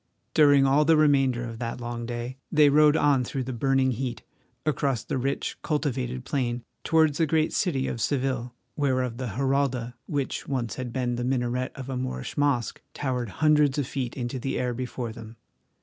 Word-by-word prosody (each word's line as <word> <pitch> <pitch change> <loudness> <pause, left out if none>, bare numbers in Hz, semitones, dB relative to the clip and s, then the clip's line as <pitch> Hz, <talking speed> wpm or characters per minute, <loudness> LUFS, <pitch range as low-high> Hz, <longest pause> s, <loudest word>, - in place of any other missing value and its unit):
During 145 -3 +6
all 140 +3 +4
the 160 +1 +4
remainder 135 -5 +3
of 115 -1 -8
that 120 0 -4
long 120 -1 -5
day 120 +2 -5
they 150 -1 +6
rode 150 +1 +5
on 145 -4 +3
through 130 +2 -3
the 130 +1 -4
burning 135 +2 +2
heat, 125 +1 -4 0.4
across 140 -5 0
the 130 - -2
rich, 135 +2 -2
cultivated 130 -5 -2
plain, 125 -3 -1 0.2
towards 160 -2 +3
the 165 - +3
great 155 +1 +1
city 140 -8 0
of 120 - -3
Seville, 130 -3 -1 0.2
whereof 130 -4 0
the 125 -5 -4
Giralda, 135 -3 0
which 140 -3 -2
once 120 -6 -2
had 125 -2 -5
been 120 -1 -1
the 120 - -2
minaret 125 0 -1
of 135 -2 -7
a 130 -1 -3
Moorish 130 0 -4
mosque, 140 -5 0
towered 125 -5 -2 0.2
hundreds 150 -2 +4
of 145 - 0
feet 130 -1 -4
into 125 +1 -3
the 135 +2 -2
air 125 -1 -1
before 125 -1 -4
them. 115 -1 -10
130 Hz, 180 wpm, -26 LUFS, 120-140 Hz, 0.4 s, During